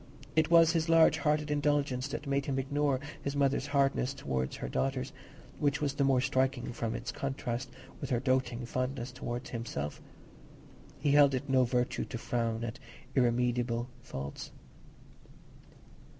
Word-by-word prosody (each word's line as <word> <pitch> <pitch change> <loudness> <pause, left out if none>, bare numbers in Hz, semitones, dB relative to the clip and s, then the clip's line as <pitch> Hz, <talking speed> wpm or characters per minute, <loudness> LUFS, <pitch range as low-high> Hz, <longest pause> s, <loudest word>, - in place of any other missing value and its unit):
It 160 0 +3
was 165 -1 +7
his 165 -1 0
large 165 -1 +6
hearted 150 0 +1
indulgence 145 -3 +1
that 145 - -5
made 140 0 0
him 135 -2 0
ignore 140 0 +1 0.2
his 140 0 -3
mother's 140 0 +1
hardness 140 -2 +1
towards 65 - -2
her - - -5
daughters, 130 - -1 0.5
which 145 0 +1
was 145 -3 0
the 140 - +1
more 135 -2 +4
striking 130 -2 0
from 115 -1 -2
its - - -4
contrast 130 -2 -3 0.3
with 140 - -5
her 125 -3 +2
doting 130 -1 0
fondness 125 0 -2
towards 120 -1 -5
himself; 110 - -4 1.0
he 145 0 +1
held 140 -1 +6
it 140 +3 -3
no 130 -1 +4
virtue 125 0 0
to 120 - -5
frown 115 -1 -1
at 115 +2 -5 0.3
irremediable 120 -1 +1
faults. 70 +1 -6
130 Hz, 150 wpm, -31 LUFS, 120-140 Hz, 1.0 s, was